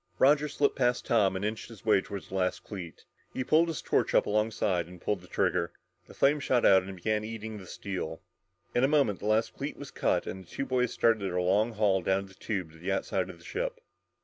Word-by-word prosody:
Roger 145 +5 +5
slipped 145 0 +1
past 125 -1 +1
Tom 100 -5 +3
and 95 +2 -2
inched 110 +2 -3
his 110 -3 -13
way 105 -3 +5
toward 100 -3 -7
the - - -14
last 95 -1 0
cleat. 90 -6 -8 0.3
He 130 - -1
pulled 160 +5 +4
his 160 -6 -4
torch - - +1
up - - +5
alongside 105 -5 0
and 90 0 -12
pulled 95 +1 -1
the 90 - -15
trigger. 90 -2 0 0.3
The - - -14
flame 145 +2 +3
shot 130 -4 +2
out 95 -1 +7
and 95 +1 -8
began 105 +4 -1
eating 110 -1 -6
the 95 - -11
steel. 90 -5 -5 0.5
In 120 - +2
a - - +6
moment 140 -9 +2
the 105 - -4
last 110 +1 +2
cleat - - -5
was - - -9
cut - - +1
and 95 - -6
the 85 - -22
two 135 - -3
boys 125 -2 +1
started 115 -2 +2
their 90 -2 -1
long 100 +6 +2
haul 100 -3 +2
down 95 +2 +1
the 95 - -16
tube 95 -4 -4
to 80 - -16
the 90 +4 -2
outside 95 -1 -1
of 90 - -9
the - - -18
ship. - - -3
105 Hz, 235 wpm, -29 LUFS, 95-120 Hz, 0.5 s, out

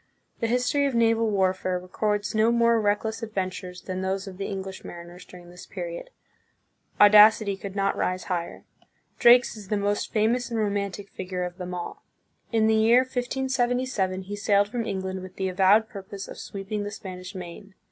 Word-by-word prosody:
The 230 - 0
history 250 +4 +1
of 270 - -2
naval 230 -1 +3
warfare 185 -2 0
records 205 +3 -2
no 220 +1 +3
more 235 -1 +3
reckless 215 +2 0
adventures 185 -4 -5
than 185 -1 -4
those 190 +1 -2
of 185 -1 -9
the 195 - -3
English 190 -1 -6
mariners 175 +1 -10
during 175 -1 -13
this 180 - -12
period. - - -6 0.9
Audacity 210 0 +7
could 195 0 -8
not 195 -1 +1
rise 185 0 -1
higher. 175 -2 -4 0.6
Drake's 245 0 +6
is 210 -3 -10
the 210 - 0
most 205 +1 -1
famous 235 +3 +1
and 230 -1 -2
romantic 200 -1 -2
figure 185 -1 -4
of 180 +1 -6
them 180 0 -5
all. 175 - -6 0.5
In 225 -2 +3
the 220 - +4
year 225 +3 +5
1577, 245 -6 -1
he 200 +2 -6
sailed 205 0 +2
from 230 0 -3
England 190 -1 -3
with 185 0 -10
the 190 -1 -2
avowed 195 +4 +4
purpose 195 -1 -8
of - - -10
sweeping 200 +1 -5
the 205 - -3
Spanish 185 -2 -8
Main. 185 +2 -9
205 Hz, 175 wpm, -26 LUFS, 185-225 Hz, 0.9 s, Audacity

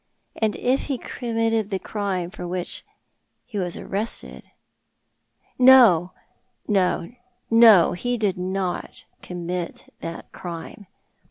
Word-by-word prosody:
And 220 -2 0
if 260 +2 0
he 275 -3 -2
committed 225 -3 -1
the 195 - -1
crime 190 -3 -3
for 185 -4 -7
which 180 0 -4 0.6
he 215 -5 -5
was 175 -2 -2
arrested 210 +4 -5 0.6
" - - -50 0.2
"No, 235 -10 +7 0.6
no, 190 -2 +1 0.4
no! 225 -7 +7
lie 245 0 +1
did 210 -5 0
not 185 0 -4 0.2
commit 175 0 -6
that 165 - -7
crime. 175 +4 -8
195 Hz, 110 wpm, -23 LUFS, 180-225 Hz, 0.6 s, No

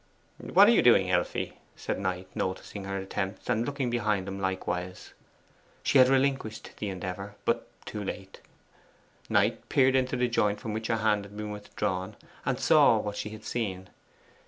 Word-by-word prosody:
'What - - +5
are - - +7
you - - +5
doing, - - +5
Elfie?' - - -1 0.2
said - - -3
Knight, 95 -1 -2
noticing 95 +1 -4
her 95 0 -3
attempts, 95 +1 -4
and 110 - +1
looking 140 -4 -2
behind 105 -5 0
him 95 0 -5
likewise. 95 -1 -3 0.7
She 140 - +4
had 130 - +8
relinquished 135 -4 0
the 105 - -2
endeavour, 95 +2 -5
but - - 0 0.2
too 105 - -5
late. 95 0 -7 0.9
Knight - - +1
peered 130 -1 +4
into 130 0 +1
the 125 0 +2
joint 105 -3 +1
from 110 - -5
which 110 +1 -3
her 115 - +1
hand 105 -2 +1
had 100 +1 -12
been 105 0 -4
withdrawn, 105 -1 -3 0.3
and - - 0
saw - - +6
what 105 0 -3
she 105 - -4
had 110 0 -10
seen. 95 -6 -3
105 Hz, 170 wpm, -28 LUFS, 95-115 Hz, 0.9 s, had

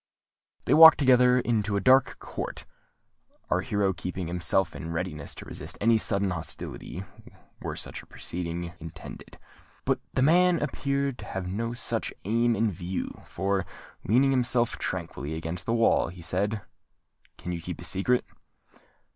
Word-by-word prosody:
They - - +3
walked 160 0 +10
together 125 -2 +5
into 105 -4 0
a - - +2
dark 130 +5 +4
court, - - -6 0.9
our 90 - +3
hero 100 -1 0
keeping 90 +2 -5
himself 85 +1 0
in 80 - -6
readiness 80 -3 -4
to - - -9
resist - - -7
any 115 +1 +4
sudden 100 -2 0
hostility, 90 +1 -5 0.6
were - - -4
such - - -6
a - - -20
proceeding 85 0 -5
intended. 80 0 -10 0.5
But - - +1
the 130 - +2
man 175 +3 +5
appeared 140 -2 -1
to 105 - -8
have 95 -2 -4
no 115 +6 -2
such 120 - -2
aim 115 +3 +2
in 110 0 +1
view, 90 +1 -5
for, 95 +1 -1 0.4
leaning 130 +6 +4
himself 125 -2 +1
tranquilly 80 -5 -4
against 80 +2 -5
the 115 - +1
wall, 115 -1 +3
he 85 0 -10
said, 100 +5 -1 0.7
"Can 90 - -6
you 85 -1 -4
keep - - -6
a - - -7
secret?" 120 +6 +1
100 Hz, 150 wpm, -27 LUFS, 90-120 Hz, 0.9 s, walked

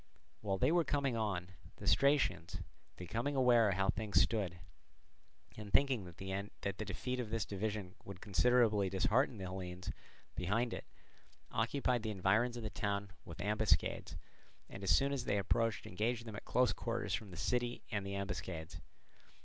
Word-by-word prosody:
While 100 -2 -1
they 130 +8 +3
were 175 0 +4
coming 140 -5 0
on, 100 -6 -1 0.3
the - - -9
Stratians, 140 - +3 0.4
becoming 115 +10 -2
aware 120 -4 +5
how 95 +1 +1
things 105 -2 +1
stood, 100 -6 +1 1.0
and 105 -2 -8
thinking 130 -2 +3
that 90 -2 -11
the 100 +2 -4
defeat 125 +6 -3
of 120 -4 -3
this 115 -1 -1
division 100 -2 -3
would 100 -2 -8
considerably 110 -1 +3
dishearten 110 +6 +2
the 95 - -6
Hellenes 90 -1 -5 0.4
behind 110 +7 0
it, - - -6 0.7
occupied 120 +1 +1
the 110 - -3
environs 110 +5 +2
of 120 - -6
the 110 - -3
town 100 0 -2
with 85 - -9
ambuscades, 105 +1 +1 0.5
and 95 - -9
as 95 - -1
soon 140 +1 +4
as 130 -3 -2
they 100 - +1
approached 105 +1 +1
engaged 115 +5 -1
them 110 -2 -7
at - - -8
close 125 -1 +3
quarters - - -2
from 105 - -2
the 90 - -9
city 120 +5 -1
and 100 -3 -1
the 100 0 -4
ambuscades. 90 -5 -4
105 Hz, 160 wpm, -36 LUFS, 95-120 Hz, 1.0 s, aware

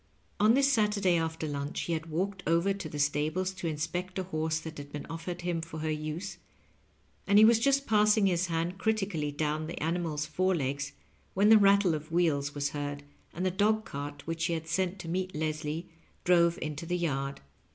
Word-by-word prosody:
On 215 +3 +5
this 275 0 +4
Saturday 210 -5 +2
after 160 -1 -1
lunch 145 +1 -3
he 170 - -2
had 160 0 -3
walked 185 +4 -2
over 170 +4 +3
to 195 -5 -6
the 150 - -6
stables 150 +6 0
to 185 -2 -5
inspect 165 +4 -3
a 190 - -1
horse 160 -3 -1
that 160 -1 -8
had 145 0 -9
been 145 - -5
ofiered 175 +2 -5
him 175 -1 -1
for 165 -1 -7
her 155 0 -1
use, 155 +5 -4 0.9
and 200 - +5
he 215 - +9
was 225 0 +6
just 275 +3 +2
passing 210 -1 +4
his 180 -1 +2
hand 170 +2 -2
critically 195 -9 0
down 155 +1 -2
the 170 - -6
animal's 160 -2 -1
fore 185 +4 +1
legs 140 -1 -2 0.4
when 200 +3 +4
the 220 - +9
rattle 200 -3 +5
of 155 +1 -5
wheels 150 -5 +1
was 145 0 0
heard, 145 0 -4 0.3
and 180 +3 -3
the 185 - +2
dog 215 +3 +2
cart 145 -2 -6
which 165 0 -2
he 170 - 0
had 160 -1 -4
sent 185 +2 0
to 175 - -8
meet 185 +1 -2
Leslie 155 +2 -3 0.4
drove 170 -1 +4
into 155 +2 -5
the 180 +1 0
yard. 140 -5 -2
165 Hz, 200 wpm, -30 LUFS, 155-190 Hz, 0.9 s, he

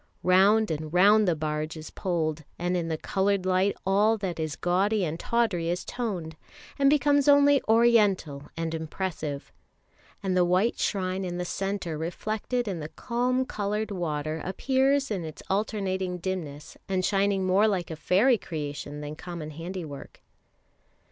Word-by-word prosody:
Round 195 +3 +4
and 155 0 -4
round 205 +4 +5
the 175 - +3
barge 155 +1 -3
is 155 - -9
poled, 160 -4 -2
and 175 +1 -1
in 170 -2 -1
the 160 -1 -2
coloured 195 +2 0
light 185 +2 +2
all 205 +4 +3
that 190 -5 -4
is 155 -2 -2
gaudy 190 +3 +1
and 165 +1 -4
tawdry 210 -8 0
is 175 +1 -2
toned, 185 -10 -4 0.4
and 275 0 +5
becomes 285 -1 +3
only 285 -1 +6
oriental 210 -11 +3
and 165 0 -2
impressive; 160 -3 -4 0.7
and 190 -2 0
the 180 - +4
white 185 +6 +2
shrine 190 -1 -1
in 175 -1 -4
the 180 - -3
centre 195 -4 -3
reflected 215 +8 -2
in 185 -4 -3
the 150 0 -6
calm 250 +5 -1
coloured 210 -1 -2
water 155 -4 -3
appears 270 +6 +1
in 190 -5 -2
its 155 -1 -8
alternating 190 -3 -1
dimness, 165 -5 -5
and 185 -1 0
shining 195 -1 +1
more 190 +4 +4
like 185 -5 -1
a - - -4
fairy 210 - +3
creation 145 -2 -5
than 150 +1 -6
common 165 -2 -7
handiwork. 165 -2 -8
185 Hz, 155 wpm, -27 LUFS, 160-210 Hz, 0.7 s, only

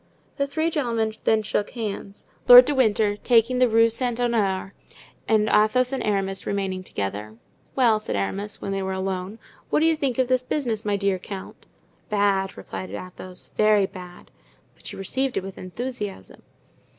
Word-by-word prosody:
The 280 -1 0
three 315 +4 -1
gentlemen 230 -7 -1
then 220 -1 +3
shook 210 -1 -1
hands, 205 -4 -6 0.2
Lord 245 0 +11
de 295 - 0
Winter 215 -5 +2
taking 240 +2 +3
the 250 -1 +4
Rue 230 +1 +4
Saint 245 0 -1
Honore, 200 -6 0 0.5
and 215 -1 +3
Athos 240 +5 +3
and 265 - -2
Aramis 195 -2 -1
remaining 195 -2 -2
together. 105 - -5 0.4
"Well," 235 -5 +4
said 215 - -4
Aramis, 195 - -3
when 195 - -4
they 195 0 -2
were 190 0 -2
alone, 190 +2 -3 0.3
"what - - +2
do 315 - +3
you 325 0 +4
think 275 -6 -2
of 260 -1 +2
this 255 0 +2
business, 245 -5 -2
my 205 -1 0
dear 200 -1 0
count?" 190 +1 -9 0.4
"Bad," 200 -2 +1
replied 95 -1 -7
Athos, 180 - -9
"very 215 -2 +4
bad." 180 -2 -11 0.4
"But - - -11
you - - -9
received 260 +7 -2
it - - -1
with 195 0 -8
enthusiasm." 205 - -6
210 Hz, 170 wpm, -24 LUFS, 190-245 Hz, 0.5 s, Lord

